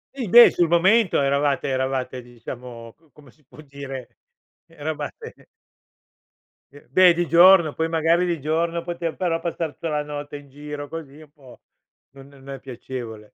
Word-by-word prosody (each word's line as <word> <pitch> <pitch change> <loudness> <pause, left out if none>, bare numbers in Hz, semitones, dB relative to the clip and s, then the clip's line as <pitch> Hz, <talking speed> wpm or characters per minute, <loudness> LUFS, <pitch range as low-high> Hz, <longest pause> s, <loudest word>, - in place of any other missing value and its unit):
I 250 -7 -4
beh, 240 +5 +9
sul 175 -2 +1
momento 185 +4 +3
eravate 140 0 0
eravate, 130 -1 -2
diciamo, 120 -1 -10
c 160 -1 -31
come 140 -1 -19
si 150 - -31
può 145 - -19
dire, 135 -3 -9 0.5
eravate 155 - -7 1.3
E 145 - -17
beh, 185 -2 +6
di 175 0 -2
giorno. 170 -2 +6
Poi 160 - -1
magari 165 +2 +2
di 170 -2 -2
giorno 165 +3 -1
potev 170 -1 -4
però 170 -3 -1
passar 165 -2 -4
tutta 165 - -6
la 150 -1 -1
notte 145 0 -7
in 145 -1 -15
giro 145 +1 -8
così 150 -2 -9
è - - -13
un 150 - -20
po' 135 -4 -18 0.5
non 135 0 -15
non 140 -1 -16
è 135 -1 -7
piacevole. 120 -4 -9
150 Hz, 165 wpm, -22 LUFS, 135-170 Hz, 1.3 s, beh